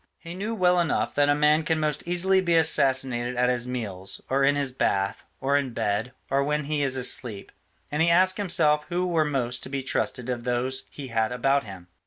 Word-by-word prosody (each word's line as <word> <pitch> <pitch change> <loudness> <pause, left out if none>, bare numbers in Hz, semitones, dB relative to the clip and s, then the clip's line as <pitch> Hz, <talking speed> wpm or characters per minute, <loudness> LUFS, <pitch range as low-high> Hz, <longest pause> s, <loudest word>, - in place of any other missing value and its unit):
He 170 0 -9
knew 210 +5 -4
well 180 -3 +3
enough 170 -2 0
that 145 0 +2
a 145 - +4
man 150 +1 +3
can 160 0 -1
most 150 0 -2
easily 190 +2 +2
be 170 -2 +1
assassinated 130 -6 +2
at 125 0 +2
his 125 -1 -1
meals, 100 -7 -5
or 135 +1 +2
in 140 +1 +4
his 140 -2 0
bath, 100 -6 -1
or 140 +1 0
in 140 -4 0
bed, 105 +5 -1 0.2
or 140 +1 +1
when 150 +1 -1
he 150 +1 -2
is 135 -2 +1
asleep, 125 -4 -2 0.4
and 150 +2 0
he 165 - +4
asked 185 +2 +4
himself 150 -6 +1
who 180 +1 -1
were 165 -3 +1
most 125 -4 -2
to - - -9
be 135 -1 -3
trusted 130 -1 -2
of 125 -2 -3
those 125 +2 -2
he 140 -3 -9
had 110 -1 0
about 135 +2 +1
him. 95 -4 -10
140 Hz, 215 wpm, -25 LUFS, 125-160 Hz, 0.4 s, a